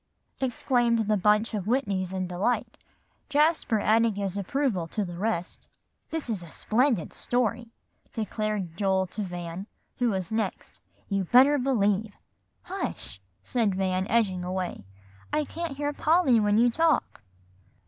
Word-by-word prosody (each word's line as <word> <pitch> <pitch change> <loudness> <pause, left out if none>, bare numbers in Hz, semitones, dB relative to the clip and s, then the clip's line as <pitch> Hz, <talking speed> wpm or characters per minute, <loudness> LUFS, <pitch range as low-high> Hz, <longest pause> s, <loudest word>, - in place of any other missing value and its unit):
exclaimed 245 -2 +1
the 215 - +3
bunch 210 +3 +2
of 205 -4 -2
Whitneys 200 -6 0
in 185 -1 -2
delight, 185 +7 -1 0.5
Jasper 295 -6 +2
adding 220 +1 +3
his 195 -2 -3
approval 200 - -1
to 210 +4 -2
the 175 -1 -7
rest. 185 -2 -3 0.4
"This 320 -4 -3
is 215 -6 -2
a 170 - -10
splendid 230 - 0
story," 240 -1 -1 0.4
declared 215 -5 -3
Joel 190 -1 +1
to 205 +4 -6
Van, 175 0 -5 0.3
who 245 -1 +3
was 190 -3 -2
next, 220 -3 -3 0.3
"you 195 -2 0
better 270 - +6
believe." 210 -5 +1 0.5
"Hush!" 355 - -5 0.2
said 220 - 0
Van, 190 0 0
edging 200 -6 +1
away; 180 - -4 0.5
"I 300 - +1
can't 330 -2 -5
hear 290 0 -1
Polly 300 -6 +4
when 210 0 +3
you 240 +1 +5
talk." 320 - +1
215 Hz, 140 wpm, -27 LUFS, 190-245 Hz, 0.5 s, better